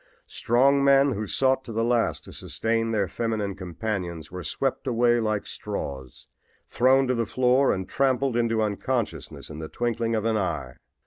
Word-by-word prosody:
Strong 135 Hz, +4 st, +2 dB
men 140 Hz, 0 st, +5 dB
who 105 Hz, -2 st, -3 dB
sought 130 Hz, +2 st, +2 dB
to 120 Hz, -, -8 dB
the 115 Hz, +1 st, 0 dB
last 120 Hz, -1 st, +1 dB
to -, -, -11 dB
sustain 115 Hz, 0 st, -1 dB
their 105 Hz, -4 st, 0 dB
feminine 110 Hz, -3 st, -2 dB
companions 90 Hz, -3 st, -5 dB
were 90 Hz, 0 st, -6 dB
swept 135 Hz, +5 st, -2 dB
away 120 Hz, -1 st, +3 dB
like 110 Hz, -2 st, -1 dB
straws, 65 Hz, -2 st, -6 dB, 0.4 s
thrown 130 Hz, +2 st, +3 dB
to 130 Hz, -, +1 dB
the 115 Hz, -3 st, -1 dB
floor 130 Hz, +3 st, +3 dB
and 95 Hz, -1 st, -2 dB
trampled 135 Hz, -1 st, +1 dB
into 115 Hz, -2 st, +1 dB
unconsciousness 100 Hz, -, -3 dB
in 75 Hz, -, -8 dB
the 80 Hz, -1 st, -6 dB
twinkling 115 Hz, -1 st, -1 dB
of 110 Hz, 0 st, -1 dB
an 110 Hz, -1 st, +2 dB
eye. 90 Hz, -10 st, -2 dB
115 Hz, 170 wpm, -25 LUFS, 100-125 Hz, 0.4 s, men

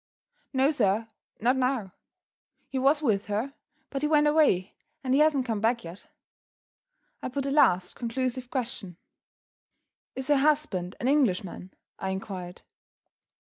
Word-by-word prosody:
"No, 270 Hz, +2 st, +3 dB
sir 220 Hz, -5 st, +1 dB, 0.3 s
not 245 Hz, +4 st, +3 dB
now. 250 Hz, -7 st, 0 dB, 0.8 s
He 265 Hz, -, -2 dB
was 285 Hz, +4 st, +3 dB
with 210 Hz, -6 st, +1 dB
her; 215 Hz, +7 st, -2 dB, 0.4 s
but 275 Hz, -, -3 dB
he 300 Hz, -, +2 dB
went 300 Hz, -1 st, +4 dB
away 295 Hz, -, +3 dB, 0.3 s
and 260 Hz, -1 st, 0 dB
he 275 Hz, -, +4 dB
hasn't 300 Hz, -4 st, +3 dB
come 225 Hz, -4 st, -2 dB
back 230 Hz, +1 st, +1 dB
yet." 170 Hz, +4 st, -10 dB, 1.1 s
I -, -, -3 dB
put 275 Hz, +1 st, -3 dB
a 275 Hz, -, -1 dB
last 185 Hz, -11 st, +3 dB
conclusive 255 Hz, +1 st, -2 dB
question. 230 Hz, -, -4 dB, 1.2 s
"Is 265 Hz, +1 st, -4 dB
her 290 Hz, -, +5 dB
husband 270 Hz, -11 st, +1 dB
an 245 Hz, -, -1 dB
Englishman?" 195 Hz, -9 st, 0 dB, 0.2 s
I 190 Hz, -, -2 dB
inquired. 190 Hz, -2 st, -6 dB
250 Hz, 140 wpm, -27 LUFS, 195-275 Hz, 1.2 s, her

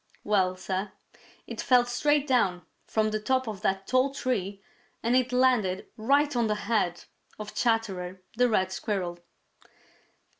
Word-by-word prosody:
Well, 190 Hz, -3 st, +1 dB
Sir, 190 Hz, +2 st, -3 dB, 0.5 s
it -, -, -5 dB
fell 250 Hz, -2 st, +4 dB
straight 290 Hz, +4 st, +1 dB
down, 195 Hz, -, +1 dB, 0.2 s
from 215 Hz, -1 st, +1 dB
the 215 Hz, -, -1 dB
top 260 Hz, +3 st, 0 dB
of 205 Hz, -3 st, -5 dB
that 195 Hz, -2 st, 0 dB
tall 255 Hz, +4 st, +2 dB
tree, 205 Hz, -8 st, -3 dB, 0.4 s
and 235 Hz, +2 st, +2 dB
it 255 Hz, -1 st, +2 dB
landed 250 Hz, -7 st, +2 dB
right 280 Hz, +5 st, +2 dB
on 235 Hz, -2 st, +2 dB
the 210 Hz, -, 0 dB
head 175 Hz, -7 st, 0 dB, 0.3 s
of 210 Hz, 0 st, -7 dB
Chatterer 195 Hz, -6 st, -1 dB
the 245 Hz, +1 st, +3 dB
Red 190 Hz, -4 st, +1 dB
Squirrel! 185 Hz, -4 st, -3 dB
215 Hz, 145 wpm, -27 LUFS, 190-250 Hz, 0.5 s, fell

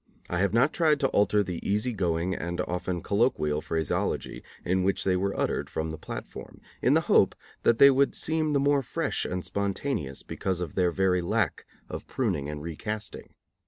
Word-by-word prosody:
I 90 Hz, -, 0 dB
have 100 Hz, -1 st, +2 dB
not 125 Hz, +7 st, +3 dB
tried 155 Hz, -3 st, +3 dB
to 135 Hz, -, +3 dB
alter 105 Hz, 0 st, +3 dB
the 90 Hz, -3 st, -4 dB
easy 105 Hz, +5 st, 0 dB
going 90 Hz, -2 st, 0 dB
and 85 Hz, -1 st, -4 dB
often 90 Hz, 0 st, -3 dB
colloquial 100 Hz, -, +1 dB
phraseology 80 Hz, -1 st, -2 dB, 0.2 s
in 95 Hz, +1 st, +2 dB
which 95 Hz, +1 st, +1 dB
they 95 Hz, -1 st, +2 dB
were 100 Hz, +2 st, -1 dB
uttered -, -, -1 dB
from 80 Hz, 0 st, -3 dB
the 80 Hz, -, -6 dB
platform, -, -, -8 dB, 0.2 s
in -, -, +4 dB
the -, -, +4 dB
hope -, -, +4 dB, 0.3 s
that 115 Hz, -, +3 dB
they 140 Hz, +2 st, +9 dB
would 135 Hz, +1 st, +2 dB
seem 155 Hz, -1 st, 0 dB
the 140 Hz, -, +3 dB
more 140 Hz, 0 st, +3 dB
fresh 125 Hz, -, -2 dB
and 90 Hz, -1 st, -3 dB
spontaneous 100 Hz, -, -2 dB
because 95 Hz, -2 st, -3 dB
of 85 Hz, -4 st, -4 dB
their 90 Hz, -2 st, +2 dB
very 90 Hz, 0 st, +2 dB
lack 95 Hz, -1 st, -1 dB, 0.2 s
of -, -, -7 dB
pruning 70 Hz, 0 st, -1 dB
and 75 Hz, -1 st, -6 dB
recasting. 105 Hz, +6 st, -5 dB
95 Hz, 185 wpm, -27 LUFS, 85-115 Hz, 0.3 s, they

